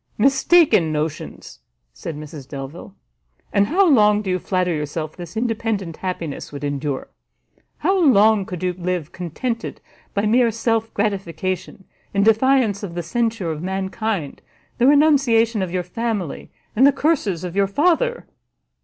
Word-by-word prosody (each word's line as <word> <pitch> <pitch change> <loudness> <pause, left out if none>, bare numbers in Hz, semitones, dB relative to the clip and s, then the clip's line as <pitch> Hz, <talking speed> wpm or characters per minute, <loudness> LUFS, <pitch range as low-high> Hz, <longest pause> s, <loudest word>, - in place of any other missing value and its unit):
"Mistaken 270 - +4
notions!" 155 0 -5 0.3
said 160 -3 -7
Mrs 150 -3 -9
Delvile; 135 - -8 0.6
"and 200 0 +3
how 380 - +3
long 210 -7 +4
do 190 - -2
you 185 - 0
flatter 180 -1 0
yourself 155 +1 -4
this 175 +1 -9
independent 220 -7 -2
happiness 175 -5 -5
would 145 0 -8
endure? 145 -1 -3 0.7
How 380 +5 +1
long 215 -7 +5
could 180 -1 -6
you 180 -1 0
live 175 -3 -3
contented 225 - -4 0.4
by 200 +1 +1
mere 235 +2 +4
self 225 0 -1
gratification, 190 -2 -3 0.3
in 200 - +3
defiance 225 -1 +3
of 185 -5 -6
the 175 - -3
censure 225 -1 -1
of 155 -1 -5
mankind, 190 -2 -3 0.4
the 245 - +4
renunciation 270 -7 +4
of 185 -2 -3
your 180 0 -1
family, 205 -2 -4 0.3
and 260 +5 +6
the - - +6
curses 270 - 0
of 180 0 -5
your 200 0 +3
father?" 355 - +1
200 Hz, 145 wpm, -21 LUFS, 170-230 Hz, 0.7 s, and